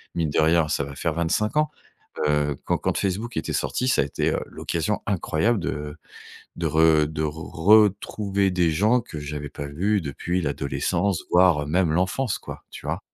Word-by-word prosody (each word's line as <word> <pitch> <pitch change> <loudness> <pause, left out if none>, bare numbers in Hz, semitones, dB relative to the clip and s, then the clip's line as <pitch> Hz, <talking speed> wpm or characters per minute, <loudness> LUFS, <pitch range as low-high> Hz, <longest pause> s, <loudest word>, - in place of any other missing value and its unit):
mine 80 -2 0
de - - 0
rien, 80 0 +3
ça 75 -1 0
va 70 0 -7
faire 80 +2 -1
25 85 - 0
ans, 150 0 +2 0.6
heu, 75 -1 +1
quand - - 0
quand - - -1
Facebook 105 +5 -2
était 80 - -2
sorti, 125 - -1
ça 130 - +3
a - - +2
été, 70 - -1
heu, - - -1
l'occasion 105 +6 -2
incroyable 100 +3 0
de 75 -2 -4 0.6
de - - -2
re 80 -1 +4
de 80 0 -4
retrouver 100 +5 +2
des 90 -3 +2
gens 105 +10 +3
que 80 -8 -8
j'avais 75 0 -5
pas 70 0 -7
vus 100 +8 0
depuis 85 +4 -3
l'adolescence, 75 +6 -1
voire 90 -5 +4
même 85 0 +2
l'enfance 95 +8 0
quoi, - - -9
tu - - -10
vois? - - -2
85 Hz, 180 wpm, -24 LUFS, 75-100 Hz, 0.6 s, re